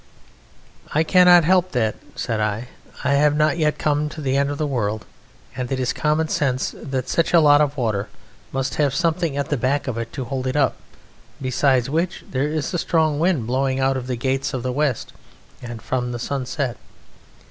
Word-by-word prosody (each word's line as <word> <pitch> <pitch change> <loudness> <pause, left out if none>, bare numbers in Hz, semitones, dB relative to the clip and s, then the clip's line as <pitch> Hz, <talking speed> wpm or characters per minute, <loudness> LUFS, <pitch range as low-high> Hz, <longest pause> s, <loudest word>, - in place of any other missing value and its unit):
'I 155 - +4
cannot 180 0 +6
help 185 +1 +2
that,' 110 -4 +1 0.2
said 115 -3 -2
I; 110 +3 -2 0.3
'I - - +2
have 145 +1 +3
not 155 +3 +2
yet 150 -1 +1
come 150 0 0
to 155 - -9
the 135 -3 -1
End 140 0 +2
of 145 - -3
the 155 - -1
World, 110 -6 -2 0.5
and 125 -1 -4
it 135 - -1
is 125 -1 0
common 155 +1 +1
sense 130 -4 0
that 130 -3 -3
such 165 +4 +1
a - - +8
lot 145 -1 +6
of 145 -1 0
water 105 -5 -1 0.4
must 135 0 -2
have 140 -2 +1
something 165 -3 0
at 140 -1 -2
the 145 - +2
back 135 +4 0
of 120 -3 -2
it 115 - -5
to 130 - -4
hold 130 0 -3
it 130 - -2
up; 140 -4 +2 0.6
besides 130 -1 +2
which 165 +5 -2
there 135 +3 -1
is 155 +1 -2
a 175 - 0
strong 155 -3 +1
wind 165 -8 +1
blowing 130 +2 0
out 135 0 +2
of 130 -1 -4
the 125 - -1
gates 135 +2 -1
of 125 - -4
the 130 - -1
west 140 -4 -1 0.5
and 120 -2 -8
from 125 -1 -2
the - - -3
sunset. 130 0 -3
135 Hz, 200 wpm, -22 LUFS, 125-150 Hz, 0.6 s, a